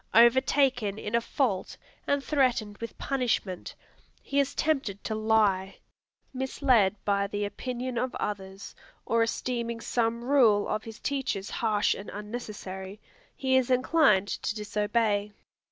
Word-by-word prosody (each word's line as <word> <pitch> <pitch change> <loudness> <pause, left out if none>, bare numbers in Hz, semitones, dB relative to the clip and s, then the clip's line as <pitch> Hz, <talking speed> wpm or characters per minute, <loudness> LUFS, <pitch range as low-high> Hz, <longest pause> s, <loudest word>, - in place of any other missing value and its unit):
Overtaken 245 -2 +4
in 210 0 -6
a 235 - +3
fault 230 -6 -1 0.3
and 285 -1 +1
threatened 245 -8 +1
with 230 -2 -7
punishment, 240 -9 -2 0.5
he 280 - 0
is 280 -1 0
tempted 270 -11 -1
to 220 - -2
lie. 215 -3 +2 0.6
Misled 255 -6 +2
by 200 -1 +1
the 205 0 -2
opinion 245 +4 -4
of 255 +1 -2
others, 195 -1 -5 0.3
or 230 0 +2
esteeming 235 0 -2
some 230 0 -1
rule 240 -6 +4
of 215 +1 -2
his 225 -1 -9
teachers 265 -8 -2
harsh 215 -3 +1
and 200 - -8
unnecessary, 205 -3 -7 0.4
he 260 -1 +1
is 260 -1 +3
inclined 255 -6 +4
to 210 - -3
disobey. 210 0 0
225 Hz, 130 wpm, -28 LUFS, 205-255 Hz, 0.6 s, Overtaken